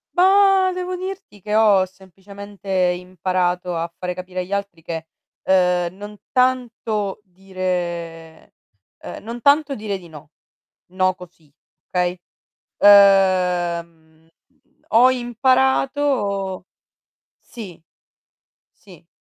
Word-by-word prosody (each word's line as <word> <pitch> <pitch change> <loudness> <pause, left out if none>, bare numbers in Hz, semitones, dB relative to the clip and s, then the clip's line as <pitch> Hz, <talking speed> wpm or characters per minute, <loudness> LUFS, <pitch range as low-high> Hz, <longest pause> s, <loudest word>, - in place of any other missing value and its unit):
Ba 385 +1 +4
devo 365 0 -4
dirti 375 - -8
che 210 +2 -3
ho 210 -4 +4
semplicemente 195 +2 -13
imparato 180 -1 -1
a 165 0 -3
fare 180 0 -4
capire 185 0 -7
agli 180 +2 -5
altri 200 -4 -4
che, 165 0 -6 0.4
uhm, 180 -1 +2
non 205 +1 -10
tanto 240 -6 -1
dire 175 -4 -5 0.5
ehm, - - -9
non 235 +2 -7
tanto 285 +1 +3
dire 210 -3 -4
di 180 -2 -14
no, 155 -1 -14 0.6
no, 185 0 +1
così, 175 -5 -16 0.4
okay. 180 0 -1 0.6
Ehm, 180 -5 +3 0.6
ho 240 +3 +6
imparato 255 -5 0 0.7
sì. 190 -9 -11 1.0
Sì. 180 -5 -17
190 Hz, 95 wpm, -20 LUFS, 180-225 Hz, 1.0 s, ho